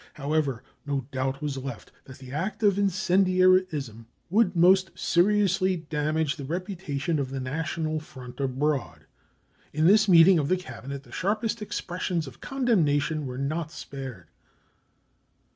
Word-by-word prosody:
However, 140 -4 -1 0.2
no 140 -3 -2
doubt 135 +2 -2
was 145 -2 -2
left 130 -6 -7
that 130 0 -12
the 130 -2 -11
act 190 +10 -3
of 200 -1 +3
incendiarism 185 - +2 0.2
would 200 -2 +3
most 185 +2 +5
seriously 190 0 +2
damage 155 -1 -1
the 140 - -6
reputation 165 -2 -3
of 135 -2 -2
the 135 0 -4
national 155 +4 -2
front 130 -5 -12
abroad. 130 - -1 0.7
In 155 +2 +1
this 210 +3 +5
meeting 170 0 +7
of 145 - -1
the 185 - +3
Cabinet 135 -3 -8
the - - -18
sharpest 215 +6 -1
expressions 180 -4 -3
of 135 -3 -12
condemnation, 160 - +1
were 125 0 -6
not 155 +4 -2
spared. 135 - -8
155 Hz, 135 wpm, -26 LUFS, 135-185 Hz, 0.7 s, meeting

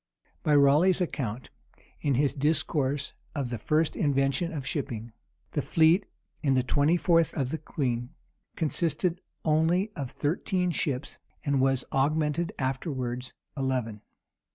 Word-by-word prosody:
By 150 - +3
Raleigh's 150 +7 +5
account, 130 - -3 0.5
in 140 -3 +1
his 140 +2 +2
discourse 145 -1 0 0.2
of 135 -4 -2
the 120 - -3
first 155 +7 +1
invention 140 +2 +1
of 145 -5 -5
shipping, 120 -6 -4 0.4
the 145 - 0
fleet, 165 +7 +4 0.3
in 135 -4 +2
the 130 - +3
twenty 145 +6 +3
fourth 165 -2 +3
of 135 -3 -1
the 160 - -2
queen, 125 -6 -2 0.5
consisted 170 +2 0 0.2
only 165 +6 +2
of 140 -6 -4
thirteen 180 +5 0
ships, 145 -3 -2 0.3
and 140 -2 +2
was 135 -1 +2
augmented 150 +5 +1
afterwards 130 -2 -3 0.2
eleven. 130 -6 -2
145 Hz, 130 wpm, -28 LUFS, 130-160 Hz, 0.5 s, Raleigh's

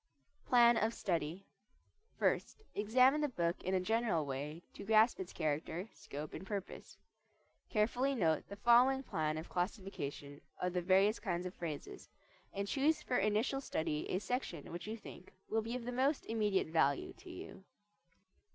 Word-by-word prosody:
PLAN 240 -1 +6
OF 225 +2 +1
STUDY 170 +1 -2 0.7
First 435 - 0
examine 255 +8 +4
the 295 - +2
book 170 -7 -1
in 185 +1 0
a - - +3
general 210 -5 +1
way 145 +5 -5
to - - -8
grasp 220 +3 +4
its 190 -1 -5
character, 160 +6 -2
scope, 150 +2 -7
and - - -6
purpose. 195 0 -6 0.7
Carefully 245 +6 +1
note 160 - +1
the 200 - -7
following 245 +5 +5
plan 155 - -1
of 160 - -5
classification 175 -7 -4 0.2
of 180 0 -1
the 180 - 0
various 195 +4 +4
kinds 180 -3 -2
of 180 - -4
phrases, 155 -4 -6 0.4
and 200 0 -3
choose 300 +6 +2
for 250 - 0
initial 215 +7 +1
study 155 - -2
a - - +1
section 205 - -3
which 175 +4 -6
you 220 +1 -4
think 185 -3 -12
will 225 +1 +1
be 230 +2 -4
of 245 -2 -5
the 245 - -3
most 270 +4 +1
immediate 210 -6 +1
value 140 -4 +2
to 370 -1 -12
you. 360 - -9
200 Hz, 160 wpm, -35 LUFS, 170-235 Hz, 0.7 s, PLAN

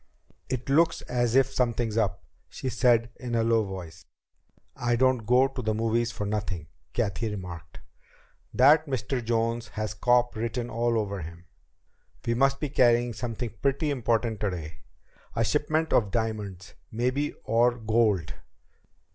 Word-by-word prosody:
"It 130 -1 -3
looks 165 +4 +3
as 120 -1 0
if 135 0 +4
something's 120 -3 0
up," 100 -4 0 0.3
she 130 - -4
said 120 -1 +3
in 120 -2 -3
a 115 - +2
low 115 -1 +3
voice. 90 -5 -8 0.7
"I 120 0 0
don't 130 -3 +2
go 125 +2 +5
to 135 -1 -5
the 110 -2 -1
movies 115 +1 0
for 105 - -4
nothing," 95 -7 -3 0.2
Cathy 110 0 -1
remarked. 85 -6 -8 0.7
"That 150 +5 +5
Mr. 125 -1 -2
Jones 115 0 0
has 110 0 -4
'cop' 120 +2 +2
written 115 +2 -3
all 115 0 +1
over 100 -3 -2
him. 85 +2 -10 0.8
We 115 - +1
must 135 +3 +2
be 150 - -2
carrying 120 -2 +3
something 115 -1 -4
pretty 140 +2 +1
important 115 -4 0
today. 85 -6 -4 0.6
A 115 - +2
shipment 155 +5 0
of 105 -4 +3
diamonds, 105 -4 -3 0.2
maybe, 125 +6 -1
or 120 +2 +3
gold." 110 -7 +1
115 Hz, 145 wpm, -27 LUFS, 105-125 Hz, 0.8 s, go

